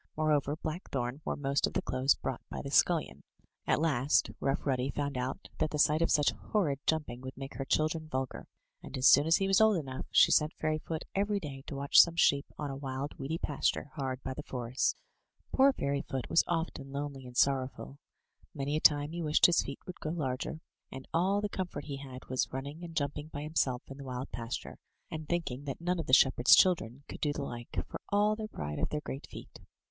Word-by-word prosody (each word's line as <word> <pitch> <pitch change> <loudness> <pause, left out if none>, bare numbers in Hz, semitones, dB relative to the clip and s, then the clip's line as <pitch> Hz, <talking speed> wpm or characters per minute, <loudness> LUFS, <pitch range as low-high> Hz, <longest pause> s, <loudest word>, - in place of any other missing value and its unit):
Moreover, 150 -2 +2
Blackthorn 150 -5 -4
wore - - -2
most 140 0 +1
of - - -7
the - - 0
clothes 130 +2 +2
brought 130 -2 -4
by - - -5
the 140 - -6
scullion. 165 +1 +2 0.5
At - - +3
last. 145 -3 +2
Rough 135 +1 -1
Ruddy 130 -1 0
found 145 -1 -2
out 125 +1 -3
that 155 - +1
the 150 - -3
sight 150 +1 +4
of 165 - +2
such 145 -1 +4
horrid 155 -11 -1
jumping 150 -6 -1
would 130 0 -8
make 135 0 -7
her 135 - -4
children 155 +3 0
vulgar; 130 -3 -4 0.3
and, 135 - -7
as 130 - 0
soon 145 +3 +7
as 165 - +5
he 195 - 0
was 195 +2 +4
old 220 -3 +5
enough, 130 -5 -5
she - - +6
sent 150 +1 +3
Fairyfoot 155 +1 -2
every 200 +1 +1
day 140 -6 -7
to - - -5
watch 140 +1 +7
some 170 -1 +1
sheep 140 -4 +3
on 145 -2 -3
a - - -5
wild, 135 +1 -4
weedy 150 +5 -2
pasture, 145 -2 -1
hard 135 -3 -4
by 130 - -3
the 150 - -6
forest. 125 -2 -1 0.5
Poor 270 +1 +6
Fairyfoot 140 - -3
was - - +5
often 160 -5 -3
lonely 140 -2 -5
and 125 0 -10
sorrowful; 135 0 0 0.6
many 140 +1 -2
a 155 - 0
time 145 0 +4
he 170 +1 -4
wished 155 -1 +4
his 175 - +5
feet 140 - -6
would 180 - -8
grow 155 - -3
larger, 150 0 -3 0.3
and 130 0 -8
all 190 +5 +2
the 210 - 0
comfort 185 -7 -4
he 140 -2 -5
14 - - -10
THROUGH - - -8
FAIRY 130 - -10
HALLS 125 - -10
had - - -25
was 130 - 0
running 140 +5 -6
and 165 -1 -8
jumping 145 0 -2
by 145 -2 -6
himself 140 -5 0
in 135 +1 -10
the - - -7
wild 130 0 -5
pasture, 115 0 -5 0.3
and 155 -1 -6
thinking 145 -6 -2
that 135 - -4
none 175 +1 -1
of 160 - -4
the - - -2
shepherds' 130 -2 +7
children 140 -8 +2
could - - -9
do 150 - +1
the 145 -1 -3
like, 120 -3 -5
for - - -8
all 210 +1 +3
their 215 0 -5
pride 75 - -5
of - - 0
their 150 - -2
great 135 -1 -6
feet. - - -11
145 Hz, 225 wpm, -31 LUFS, 135-160 Hz, 0.6 s, soon